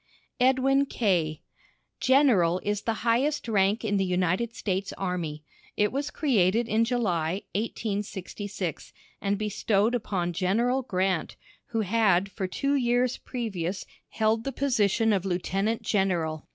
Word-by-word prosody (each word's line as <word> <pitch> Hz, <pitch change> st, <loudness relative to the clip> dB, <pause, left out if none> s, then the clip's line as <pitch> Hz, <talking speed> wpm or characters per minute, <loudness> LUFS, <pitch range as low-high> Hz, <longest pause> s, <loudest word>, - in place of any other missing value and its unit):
EDWIN 265 Hz, +2 st, +3 dB
K. 175 Hz, -, 0 dB, 0.6 s
"General" 235 Hz, -, +4 dB
is 205 Hz, 0 st, -1 dB
the 225 Hz, 0 st, -3 dB
highest 265 Hz, +5 st, +1 dB
rank 205 Hz, +1 st, +2 dB
in 205 Hz, -1 st, +1 dB
the 195 Hz, -, +2 dB
United 185 Hz, +5 st, 0 dB
States 195 Hz, -3 st, -2 dB
army. 170 Hz, -5 st, -3 dB, 0.3 s
It 210 Hz, 0 st, +2 dB
was 280 Hz, +2 st, -2 dB
created 225 Hz, -, +2 dB
in 225 Hz, +1 st, +2 dB
July, 190 Hz, -7 st, -1 dB
1866, 205 Hz, -4 st, -4 dB, 0.3 s
and 200 Hz, 0 st, 0 dB
bestowed 210 Hz, +1 st, +1 dB
upon 190 Hz, -7 st, -1 dB
General 230 Hz, +9 st, +1 dB
Grant, 185 Hz, -6 st, -1 dB, 0.3 s
who 225 Hz, -1 st, -1 dB
had 200 Hz, -2 st, +2 dB
for 190 Hz, 0 st, -3 dB
two 275 Hz, +9 st, -1 dB
years 245 Hz, -2 st, +1 dB
previous 200 Hz, -7 st, -4 dB, 0.2 s
held 220 Hz, 0 st, +1 dB
the 275 Hz, -, -3 dB
position 225 Hz, -5 st, +2 dB
of 190 Hz, -3 st, 0 dB
Lieutenant 195 Hz, +4 st, -1 dB
General. 175 Hz, -6 st, 0 dB
205 Hz, 125 wpm, -27 LUFS, 185-235 Hz, 0.6 s, General